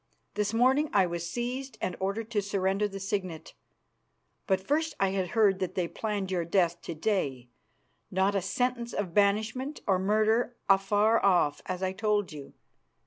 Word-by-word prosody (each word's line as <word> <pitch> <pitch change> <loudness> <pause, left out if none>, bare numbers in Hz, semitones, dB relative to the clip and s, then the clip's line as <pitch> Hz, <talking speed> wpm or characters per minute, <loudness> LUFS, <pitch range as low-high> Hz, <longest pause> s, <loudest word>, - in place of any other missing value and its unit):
This 210 -1 0
morning 260 +6 +3
I 195 -2 +5
was 170 -1 -4
seized 245 +2 -4
and 180 - -2
ordered 210 +4 -3
to 210 -3 +1
surrender 195 +1 0
the 195 -1 -7
signet; 190 -5 -4 0.9
but 190 -1 +2
first 300 +9 -1
I 195 - +3
had 190 -1 -1
heard 200 -4 +4
that 185 -2 -3
they 180 -2 0
planned 205 -1 -3
your 180 -2 0
death 170 0 +1
to 170 - -6
day, 145 - -1 0.6
not 190 +2 +1
a 195 - +1
sentence 240 +4 -1
of 190 -5 -3
banishment 220 - +1
and 190 -2 +2
murder 220 +4 +2
afar 205 +3 +3
off, 175 -7 +3
as 185 0 -3
I 185 0 0
told 210 -1 0
you. 145 -2 -10
200 Hz, 165 wpm, -29 LUFS, 185-220 Hz, 0.9 s, I